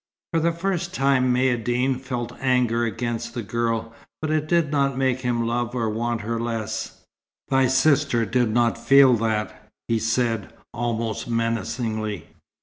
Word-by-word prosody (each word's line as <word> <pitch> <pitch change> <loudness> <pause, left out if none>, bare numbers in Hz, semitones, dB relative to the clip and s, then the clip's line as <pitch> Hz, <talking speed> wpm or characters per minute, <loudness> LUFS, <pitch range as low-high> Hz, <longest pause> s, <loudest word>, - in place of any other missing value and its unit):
For 165 - +3
the 170 +1 +2
first 175 +1 -2
time 135 -3 +3
Maïeddine 125 +1 +1
felt 125 -3 -4
anger 125 -3 +2
against 115 +1 -3
the 120 - -3
girl. 115 +1 -2 0.3
But 155 0 -2
it 155 -1 0
did 170 -3 +2
not 140 -3 +1
make 130 -1 +1
him 120 -2 0
love 120 +1 -1
or 115 -3 0
want 115 +1 -2
her 115 +2 -3
the - - -2
less. 110 -2 -4 0.5
"Thy 135 -1 +3
sister 130 -2 +3
did 120 0 +1
not 115 +1 +1
feel 135 +2 +6
that," 105 -1 -2 0.2
he 115 -1 +1
said, 115 -1 0 0.2
almost 115 -1 -2
menacingly. 115 -2 -2
120 Hz, 150 wpm, -23 LUFS, 115-130 Hz, 0.5 s, feel